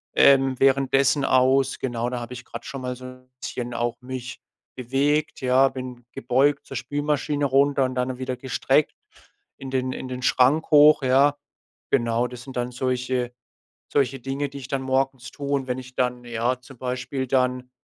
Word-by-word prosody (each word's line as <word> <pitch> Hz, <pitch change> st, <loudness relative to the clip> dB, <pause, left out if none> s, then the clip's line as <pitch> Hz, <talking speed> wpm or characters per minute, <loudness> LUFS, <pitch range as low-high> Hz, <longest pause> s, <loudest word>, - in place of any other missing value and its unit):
ähm, 135 Hz, -2 st, +5 dB
währenddessen 135 Hz, +1 st, +3 dB
aus. 130 Hz, +1 st, +3 dB
Genau, 120 Hz, -2 st, -2 dB
da 125 Hz, -, -3 dB
habe 120 Hz, +1 st, -7 dB
ich 125 Hz, +1 st, -9 dB
grad -, -, -8 dB
schon 135 Hz, -3 st, -6 dB
mal 125 Hz, 0 st, -3 dB
so 130 Hz, +1 st, -11 dB
'n 130 Hz, 0 st, -12 dB
bisschen 120 Hz, -1 st, -5 dB
auch 120 Hz, 0 st, -2 dB
mich 125 Hz, -1 st, -7 dB, 0.4 s
bewegt, 140 Hz, +4 st, 0 dB
ja? 130 Hz, +1 st, +4 dB
Bin 125 Hz, -2 st, -8 dB
gebeugt 135 Hz, +4 st, +1 dB
zur 135 Hz, -, -6 dB
Spülmaschine 145 Hz, +2 st, -1 dB
runter 140 Hz, 0 st, +3 dB
und 130 Hz, 0 st, -4 dB
dann 125 Hz, 0 st, -1 dB
wieder 130 Hz, -1 st, -3 dB
gestreckt 135 Hz, +2 st, +1 dB, 0.6 s
in 135 Hz, -1 st, -8 dB
den 130 Hz, -1 st, -1 dB
in -, -, -6 dB
den 130 Hz, 0 st, -5 dB
Schrank 135 Hz, +6 st, +3 dB
hoch, 150 Hz, 0 st, +7 dB
ja? 140 Hz, +3 st, +4 dB, 0.5 s
Genau, 120 Hz, -2 st, +2 dB
das 125 Hz, 0 st, -10 dB
sind 130 Hz, 0 st, -10 dB
dann 120 Hz, 0 st, -1 dB
solche 125 Hz, 0 st, -2 dB, 0.6 s
solche 135 Hz, -2 st, +1 dB
Dinge, 135 Hz, +3 st, -3 dB
die 140 Hz, -, -9 dB
ich 130 Hz, -, -9 dB
dann 135 Hz, 0 st, -2 dB
morgens 130 Hz, -2 st, -1 dB
tue, 140 Hz, -1 st, -6 dB
und 135 Hz, -2 st, 0 dB
wenn 125 Hz, 0 st, -2 dB
ich 130 Hz, 0 st, -12 dB
dann 125 Hz, -1 st, -1 dB
ja, 120 Hz, +2 st, -1 dB
zum 130 Hz, +1 st, -15 dB
Beispiel 130 Hz, +2 st, -3 dB
dann 125 Hz, -1 st, 0 dB
130 Hz, 180 wpm, -24 LUFS, 125-135 Hz, 0.6 s, hoch